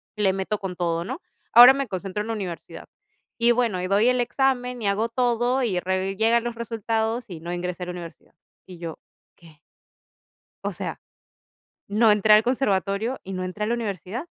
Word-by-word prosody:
le 205 Hz, -3 st, +2 dB
meto 195 Hz, +2 st, -2 dB
con 190 Hz, -2 st, -5 dB
todo, 170 Hz, -1 st, -1 dB
¿no? 260 Hz, -, -6 dB, 0.3 s
Ahora 245 Hz, +2 st, +11 dB
me 275 Hz, -1 st, -2 dB
concentro 195 Hz, +1 st, -4 dB
en 225 Hz, -, -8 dB
universidad 190 Hz, -6 st, -6 dB, 0.5 s
y, 235 Hz, +1 st, +4 dB
bueno, 230 Hz, -6 st, +1 dB
y 185 Hz, -, -2 dB
doy 200 Hz, +4 st, +3 dB
el 250 Hz, 0 st, +1 dB
examen 250 Hz, -1 st, 0 dB
y 210 Hz, -, -1 dB
hago 210 Hz, +4 st, 0 dB
todo 245 Hz, +2 st, +1 dB
y 195 Hz, -7 st, 0 dB
re 190 Hz, +1 st, -2 dB
llegan 225 Hz, +3 st, +2 dB
los 240 Hz, -1 st, -4 dB
resultados 230 Hz, 0 st, -2 dB
y 175 Hz, -3 st, -7 dB
no 170 Hz, +2 st, -5 dB
ingresé 180 Hz, +1 st, -4 dB
a -, -, -4 dB
la -, -, -3 dB
universidad. 170 Hz, -2 st, -10 dB, 0.3 s
Y 185 Hz, -2 st, -11 dB
yo: 165 Hz, -2 st, -7 dB, 0.4 s
"¿Qué?". 160 Hz, -3 st, -19 dB, 1.1 s
O -, -, -1 dB
sea, -, -, -5 dB, 0.9 s
no 215 Hz, +2 st, +4 dB
entré 210 Hz, +1 st, +5 dB
al 215 Hz, -, +6 dB
conservatorio 220 Hz, -1 st, 0 dB
y 195 Hz, -, -7 dB
no 185 Hz, -1 st, -3 dB
entré 185 Hz, +3 st, -4 dB
a -, -, -2 dB
la 235 Hz, -, 0 dB
universidad. 220 Hz, -, -4 dB
210 Hz, 190 wpm, -24 LUFS, 185-235 Hz, 1.1 s, Ahora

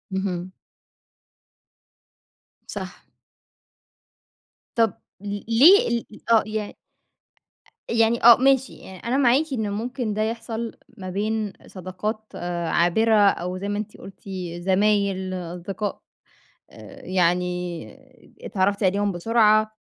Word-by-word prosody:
اهم. 185 Hz, -1 st, -3 dB, 2.2 s
صح. -, -, -8 dB, 1.7 s
طب 225 Hz, -4 st, +3 dB, 0.3 s
ل 205 Hz, 0 st, -4 dB
ليه 340 Hz, -, +6 dB
ال 235 Hz, -1 st, -1 dB
ال 215 Hz, -, -14 dB
آه 225 Hz, -, +6 dB
ي 215 Hz, 0 st, -2 dB
أ 205 Hz, -, -7 dB
أ -, -, -14 dB, 1.2 s
يعني 230 Hz, 0 st, +2 dB
آه 235 Hz, -1 st, +10 dB
ماشي 265 Hz, 0 st, +2 dB
يع 190 Hz, -1 st, -12 dB
أنا 260 Hz, -, +1 dB
معاكِ 270 Hz, +2 st, +4 dB
إن 220 Hz, -5 st, -1 dB
ممكن 235 Hz, 0 st, -3 dB
ده 215 Hz, -, -1 dB
يحصل 230 Hz, 0 st, -3 dB, 0.3 s
ما 185 Hz, -1 st, -6 dB
بين 210 Hz, +1 st, -2 dB
صداقات 190 Hz, +4 st, -5 dB
آآ 175 Hz, -1 st, -3 dB
عابرة 220 Hz, +6 st, +3 dB
أو 185 Hz, -2 st, +2 dB
زي 200 Hz, +2 st, -5 dB
ما 205 Hz, 0 st, -2 dB
أنتِ 210 Hz, 0 st, -6 dB
قُلتِ 195 Hz, -, -13 dB, 0.4 s
زمايل، 190 Hz, 0 st, +1 dB
أصدقاء، 180 Hz, +3 st, -5 dB, 0.7 s
آآ 275 Hz, -1 st, -13 dB
يعني 180 Hz, -1 st, +1 dB, 0.9 s
ات-اتعرّفتِ 200 Hz, +1 st, 0 dB
عليهم 200 Hz, +1 st, +1 dB
بسرعة، 215 Hz, +3 st, +3 dB
205 Hz, 115 wpm, -23 LUFS, 185-225 Hz, 2.2 s, آه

